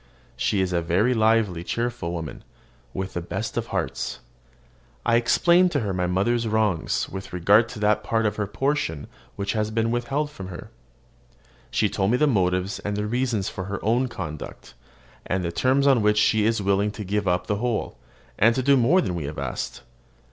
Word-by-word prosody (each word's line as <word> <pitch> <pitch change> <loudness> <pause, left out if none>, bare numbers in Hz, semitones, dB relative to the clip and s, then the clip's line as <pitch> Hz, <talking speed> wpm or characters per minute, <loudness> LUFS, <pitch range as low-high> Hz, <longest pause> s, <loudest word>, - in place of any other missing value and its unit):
She 100 - 0
is 90 -1 -1
a 85 - +1
lively, 110 0 +2
cheerful 115 -4 -2
woman, 80 -3 -6 0.5
with 95 0 -4
the 85 - -3
best 85 - -4
of - - -2
hearts. - - -3 0.9
I 115 - +3
explained 175 +9 +4
to 145 - +1
her 100 -3 -2
my 90 -1 0
mother's 115 +6 +1
wrongs 105 -6 0
with 95 0 -8
regard 100 +6 +4
to 120 -3 -8
that 105 +1 +2
part 115 +2 0
of 105 - 0
her 105 -2 -1
portion 135 - -1 0.3
which 100 0 -2
has 105 -1 0
been 115 +1 0
withheld 135 +5 -1
from 95 -10 -8
her. 90 -2 -9 1.0
She - - +1
told 95 0 0
me 125 - +3
the 150 - +3
motives 95 -6 +1
and 105 0 -3
reasons 110 -1 -1
of - - -15
her 100 0 -3
own 120 +4 +2
conduct, 75 - -7 0.5
and 95 -1 -1
the 85 - -2
terms 130 +8 +2
on 135 -5 +5
which 105 0 +3
she 105 0 +3
is 115 -2 0
willing 100 +1 +2
to 105 - -6
give 100 +1 -1
up 90 0 +1
the 105 - -1
whole, 120 0 -2 0.4
and 115 +2 +5
to 130 - 0
do 140 +2 +5
more 140 +9 +4
than 90 - -2
we 85 -4 -3
have 75 +2 -6
asked. 70 -3 -4
105 Hz, 190 wpm, -24 LUFS, 95-120 Hz, 1.0 s, on